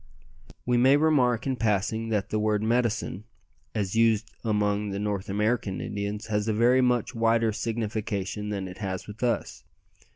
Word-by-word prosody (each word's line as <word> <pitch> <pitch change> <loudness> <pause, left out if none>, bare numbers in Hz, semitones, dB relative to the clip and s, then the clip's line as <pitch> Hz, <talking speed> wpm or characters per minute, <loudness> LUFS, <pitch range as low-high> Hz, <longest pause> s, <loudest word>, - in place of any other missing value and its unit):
We 125 0 +2
may 130 +3 +6
remark 135 -7 +2
in 135 -2 -1
passing 110 +1 0
that 105 -3 -1
the 110 - +1
word 105 0 +1
"medicine," 115 -3 0 0.5
as 100 -1 -1
used 115 -1 +3
among 105 -2 0
the 100 - -3
North 100 -2 -2
American 105 -1 0
Indians, 105 +1 -4
has 105 -1 -1
a 110 - +1
very 120 +4 +4
much 125 -1 +1
wider 115 -1 +2
signification 105 -2 -3
than 100 -2 -3
it 90 - -10
has 95 -3 -4
with 105 +1 -10
us. 120 -2 -1
110 Hz, 160 wpm, -27 LUFS, 105-115 Hz, 0.5 s, may